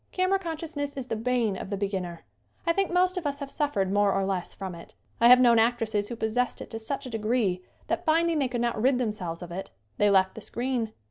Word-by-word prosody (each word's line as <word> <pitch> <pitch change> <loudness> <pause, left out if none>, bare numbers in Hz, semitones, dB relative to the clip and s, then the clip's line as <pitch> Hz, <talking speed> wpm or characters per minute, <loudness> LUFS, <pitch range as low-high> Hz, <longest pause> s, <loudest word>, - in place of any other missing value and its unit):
Camera 370 +1 +2
consciousness 320 -5 -4
is 265 - -3
the - - 0
bane 230 -2 0
of 190 - -6
the 200 - -2
beginner. 190 -4 -3 0.4
I 335 - +3
think 390 0 0
most 365 +1 +2
of 335 -5 -1
us 280 0 -2
have 280 -1 -6
suf 290 -1 -1
fered 190 -1 +1
more 205 0 +3
or 195 0 +1
less 190 -2 -3
from 190 -2 -5
it. 170 0 -12 0.2
I 235 - +6
have 250 +1 +9
known 240 -2 +6
actresses 225 -3 +1
who 235 - -5
possessed 230 +3 -1
it - - -9
to 225 - -4
such 270 +6 -4
a - - -5
degree 215 -4 0 0.2
that, - - -2
finding 330 0 +2
they 270 - +2
could 245 -1 -2
not 235 -2 0
rid 260 +2 +4
themselves 195 -8 -3
of 175 - -9
it, 190 +3 -5 0.3
they 205 - +5
left 190 -1 +4
the 220 - -9
screen. 240 -1 -2
235 Hz, 245 wpm, -27 LUFS, 200-280 Hz, 0.4 s, have